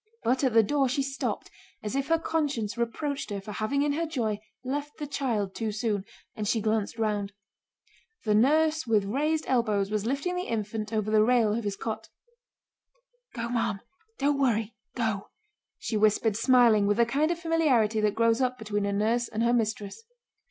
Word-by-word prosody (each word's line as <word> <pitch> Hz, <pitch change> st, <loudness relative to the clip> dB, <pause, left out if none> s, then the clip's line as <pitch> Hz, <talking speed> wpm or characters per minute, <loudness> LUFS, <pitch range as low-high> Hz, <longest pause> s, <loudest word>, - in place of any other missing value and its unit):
But 255 Hz, +4 st, +1 dB
at 260 Hz, -4 st, +2 dB
the 225 Hz, -, +7 dB
door 275 Hz, +3 st, +1 dB
she 275 Hz, +2 st, 0 dB
stopped 270 Hz, 0 st, -3 dB, 0.3 s
as 210 Hz, +4 st, -3 dB
if 275 Hz, 0 st, -1 dB
her 330 Hz, -, +3 dB
conscience 290 Hz, -10 st, -1 dB
reproached 260 Hz, +5 st, -2 dB
her 200 Hz, -1 st, -3 dB
for 195 Hz, +2 st, -8 dB
having 220 Hz, +7 st, 0 dB
in 290 Hz, -1 st, +1 dB
her 330 Hz, +3 st, -1 dB
joy 225 Hz, -9 st, -1 dB, 0.2 s
left 285 Hz, +3 st, -4 dB
the 300 Hz, -, -4 dB
child 235 Hz, -9 st, -2 dB
too 220 Hz, 0 st, -2 dB
soon, 210 Hz, -2 st, -1 dB, 0.3 s
and 210 Hz, -1 st, -3 dB
she 225 Hz, -, +2 dB
glanced 215 Hz, 0 st, -1 dB
round. 205 Hz, -3 st, -1 dB, 0.9 s
The 215 Hz, -, +1 dB
nurse 310 Hz, +6 st, +3 dB
with 215 Hz, -3 st, +3 dB
raised 300 Hz, +9 st, 0 dB
elbows 215 Hz, -5 st, +1 dB
was 215 Hz, 0 st, -1 dB
lifting 280 Hz, +8 st, -1 dB
the 360 Hz, +1 st, -3 dB
infant 215 Hz, -1 st, -3 dB
over 215 Hz, -1 st, -1 dB
the 215 Hz, -1 st, +5 dB
rail 230 Hz, -2 st, +3 dB
of 230 Hz, +1 st, -2 dB
his 200 Hz, -1 st, -1 dB
cot. 220 Hz, +2 st, -5 dB, 1.3 s
"Go, 235 Hz, -1 st, -3 dB
ma'am! 230 Hz, -4 st, -1 dB, 0.4 s
Don't 280 Hz, 0 st, +1 dB
worry, 225 Hz, -4 st, +1 dB, 0.2 s
go!" 220 Hz, -5 st, -2 dB, 0.5 s
she 220 Hz, -, -2 dB
whispered, 215 Hz, 0 st, +3 dB
smiling, 230 Hz, -3 st, +5 dB
with 205 Hz, -, +2 dB
the 235 Hz, -, +5 dB
kind 285 Hz, +6 st, +1 dB
of 345 Hz, -, 0 dB
familiarity 285 Hz, -11 st, +2 dB
that 210 Hz, -1 st, +1 dB
grows 230 Hz, +2 st, +3 dB
up 255 Hz, 0 st, 0 dB
between 205 Hz, -3 st, -2 dB
a -, -, 0 dB
nurse 225 Hz, +4 st, +1 dB
and 220 Hz, +2 st, -2 dB
her 235 Hz, +1 st, +3 dB
mistress. 215 Hz, -, -1 dB
230 Hz, 185 wpm, -28 LUFS, 215-275 Hz, 1.3 s, the